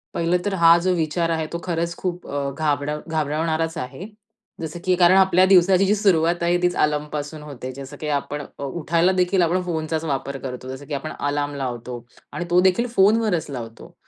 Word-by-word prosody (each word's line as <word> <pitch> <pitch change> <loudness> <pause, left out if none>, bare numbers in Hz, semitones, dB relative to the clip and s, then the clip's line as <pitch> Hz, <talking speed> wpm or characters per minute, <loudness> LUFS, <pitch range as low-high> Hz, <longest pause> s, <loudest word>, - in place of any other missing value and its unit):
पहिलं 170 +2 +2
तर, 200 - -1
हा 170 -2 +6
जो 185 +1 +1
विचार 165 +1 0
आहे, 160 -1 -1
तो 170 - -5
खरंच 170 -1 -2
खूप 180 -1 -4
अ, 140 -1 -2
घाबरड 145 0 -1 0.2
घाबरवणाराचं 160 +1 -1
आहे. 135 +10 -7 0.5
जसं 160 +1 -5
की 185 - +3
कारण 180 +1 +5
आपल्या 185 -1 +5
दिवसाची 190 0 +5
जी 205 - +3
सुरुवात 175 -4 +2
आहे, 175 +1 +2
तीच 180 0 +1
अलार्म 150 0 0
पासून 150 +1 -5
होते, 130 -3 -7
जसं 140 +2 -9
की 155 - -3
आपण 145 +1 -6 0.2
अ, - - -5
उठायला 165 +5 +1
देखील, 180 +1 +2
आपण 175 +2 +2
फोनचाच 160 -1 -2
वापर 140 -2 -3
करतो, 130 0 -6
जसं 140 +2 -11
की 150 - -6
आपण 155 +2 -4
अलार्म 145 0 -1
लावतो. 125 -2 -5 0.3
आणि 175 - -3
तो 175 - +4
देखील 235 +6 -1
फोनवरच 195 -5 +3
लावतो. 115 -3 -8
160 Hz, 190 wpm, -22 LUFS, 145-180 Hz, 0.5 s, हा